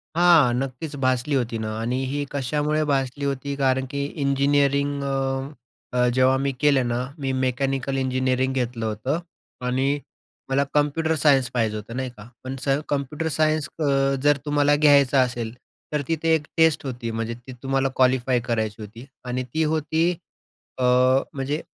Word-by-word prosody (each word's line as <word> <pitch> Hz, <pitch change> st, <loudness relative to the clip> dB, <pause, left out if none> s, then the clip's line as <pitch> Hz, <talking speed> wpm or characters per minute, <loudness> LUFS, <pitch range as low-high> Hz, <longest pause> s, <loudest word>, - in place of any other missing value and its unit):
हां, 170 Hz, -8 st, +5 dB
नक्कीच 135 Hz, +3 st, -5 dB
भासली 130 Hz, +3 st, +1 dB
होती 120 Hz, -3 st, -1 dB
ना 110 Hz, 0 st, -4 dB
आणि 125 Hz, +3 st, -1 dB
ही 145 Hz, 0 st, -1 dB
कशामुळे 150 Hz, +3 st, 0 dB
भासली 135 Hz, +1 st, -1 dB
होती 140 Hz, 0 st, -2 dB
कारण 130 Hz, -1 st, +1 dB
की 140 Hz, 0 st, -2 dB, 0.2 s
इंजिनिअरिंग 140 Hz, 0 st, +2 dB
अ, 140 Hz, -, -2 dB, 0.9 s
अ, 125 Hz, 0 st, +4 dB
जेव्हा 130 Hz, +1 st, +4 dB
मी 140 Hz, 0 st, 0 dB
केलं 140 Hz, -4 st, +3 dB
ना, 120 Hz, +1 st, -1 dB, 0.2 s
मी 135 Hz, -1 st, -1 dB
मेकॅनिकल 135 Hz, +1 st, -1 dB
इंजिनिअरिंग 130 Hz, 0 st, 0 dB
घेतलं 120 Hz, -3 st, -2 dB
होतं 120 Hz, +9 st, -2 dB, 0.5 s
आणि 135 Hz, +3 st, +1 dB, 0.5 s
मला 135 Hz, +1 st, +2 dB
कम्प्युटर 150 Hz, +2 st, +1 dB
सायन्स 135 Hz, -5 st, +3 dB
पाहिजे 110 Hz, -3 st, 0 dB
होतं, 110 Hz, +3 st, -7 dB
नाही 130 Hz, -1 st, -2 dB
का. 105 Hz, +2 st, -11 dB, 0.2 s
पण 130 Hz, +1 st, -5 dB
स 135 Hz, 0 st, +3 dB
कम्प्युटर 145 Hz, +3 st, -2 dB
सायन्स 155 Hz, -1 st, +1 dB
अ, 155 Hz, -, 0 dB, 0.4 s
जर 145 Hz, -1 st, +4 dB
तुम्हाला 145 Hz, 0 st, +3 dB
घ्यायचा 140 Hz, -3 st, +5 dB
असेल, 120 Hz, -2 st, -2 dB, 0.4 s
तर 150 Hz, -, +1 dB
तिथे 165 Hz, 0 st, +1 dB
एक 150 Hz, -2 st, -3 dB
टेस्ट 160 Hz, -3 st, +3 dB
होती 120 Hz, -3 st, -4 dB
म्हणजे 115 Hz, +1 st, -3 dB
ती 120 Hz, +2 st, -12 dB
तुम्हाला 135 Hz, 0 st, +1 dB
क्वालिफाय 130 Hz, -1 st, +3 dB
करायची 110 Hz, -3 st, -2 dB
होती 115 Hz, +5 st, -10 dB, 0.2 s
आणि 125 Hz, +1 st, -2 dB
ती 160 Hz, 0 st, +1 dB
होती, 160 Hz, +2 st, +1 dB, 0.7 s
अ, 130 Hz, -, -2 dB, 0.5 s
म्हणजे 140 Hz, +3 st, -2 dB
135 Hz, 155 wpm, -24 LUFS, 125-145 Hz, 0.9 s, हां